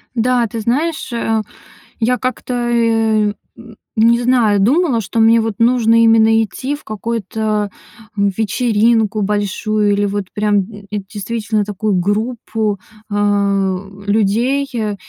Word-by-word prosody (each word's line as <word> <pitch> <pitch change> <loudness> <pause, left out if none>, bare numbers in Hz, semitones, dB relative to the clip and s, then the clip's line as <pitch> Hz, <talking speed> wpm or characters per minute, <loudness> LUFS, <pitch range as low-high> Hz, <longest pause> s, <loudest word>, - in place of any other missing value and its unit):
Да, 245 0 +2
ты 225 +1 -6
знаешь, 285 +6 -1
э, 225 -1 0 0.6
я 250 +2 +1
как-то, 255 0 -4
э, 225 -3 +1 0.2
м, 230 -1 -13 0.2
не 230 +2 +4
знаю, 235 -5 +3
думала, 260 - +2
что 220 +3 -3
мне 225 +1 +5
вот 225 -2 -2
нужно 230 -1 +4
именно 225 0 +5
идти 260 +6 -4
в 290 - -14
какую-то 215 -1 -2 0.5
вечеринку 220 +1 +1
большую 210 +1 0
или 205 0 +1
вот 200 0 -2
прям, 210 0 +1
м, 205 -2 -12
действительно 210 +1 -3
такую 210 +1 -2
группу, 215 +1 -1 0.3
а, 200 -2 +1 0.3
людей, 225 +7 +1
э, 215 -3 -2
220 Hz, 125 wpm, -17 LUFS, 205-235 Hz, 0.6 s, мне